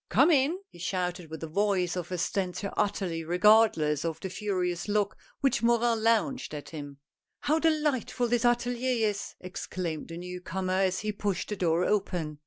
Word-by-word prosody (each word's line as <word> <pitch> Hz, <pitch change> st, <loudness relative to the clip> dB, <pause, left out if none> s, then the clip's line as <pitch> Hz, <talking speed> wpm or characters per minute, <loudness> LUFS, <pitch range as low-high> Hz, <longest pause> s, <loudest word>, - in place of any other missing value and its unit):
Come 275 Hz, +9 st, +5 dB
in! 295 Hz, +3 st, +3 dB
he -, -, -15 dB
shouted 180 Hz, -2 st, -2 dB
with 160 Hz, 0 st, -7 dB
the 160 Hz, -, -4 dB
voice 185 Hz, 0 st, +1 dB
of 180 Hz, -1 st, -4 dB
a 180 Hz, -, -1 dB
stentor 190 Hz, +2 st, -2 dB
utterly 185 Hz, -5 st, -1 dB
regardless 175 Hz, -4 st, +4 dB
of 165 Hz, -1 st, -3 dB
the 190 Hz, -, -5 dB
furious 180 Hz, -4 st, -2 dB
look 205 Hz, -1 st, +1 dB, 0.3 s
which 275 Hz, -, +2 dB
Morin 235 Hz, -1 st, +3 dB
launched 230 Hz, -, +1 dB
at 145 Hz, -1 st, -7 dB
him. 145 Hz, -2 st, -8 dB, 0.2 s
" -, -, -58 dB
How 310 Hz, +2 st, +2 dB
delightful 300 Hz, -6 st, +1 dB
this 240 Hz, 0 st, +1 dB
atelier 240 Hz, -1 st, +2 dB
is! 205 Hz, -1 st, -4 dB
" -, -, -59 dB
exclaimed 180 Hz, -3 st, -5 dB
the 165 Hz, -, -7 dB
new 180 Hz, +1 st, -6 dB
comer 185 Hz, 0 st, -2 dB
as 190 Hz, -1 st, +1 dB
he 215 Hz, 0 st, -1 dB
pushed 200 Hz, -3 st, -2 dB
the 210 Hz, -, -2 dB
door 175 Hz, -1 st, +1 dB
open. 175 Hz, -7 st, -1 dB
195 Hz, 185 wpm, -29 LUFS, 175-230 Hz, 0.3 s, Come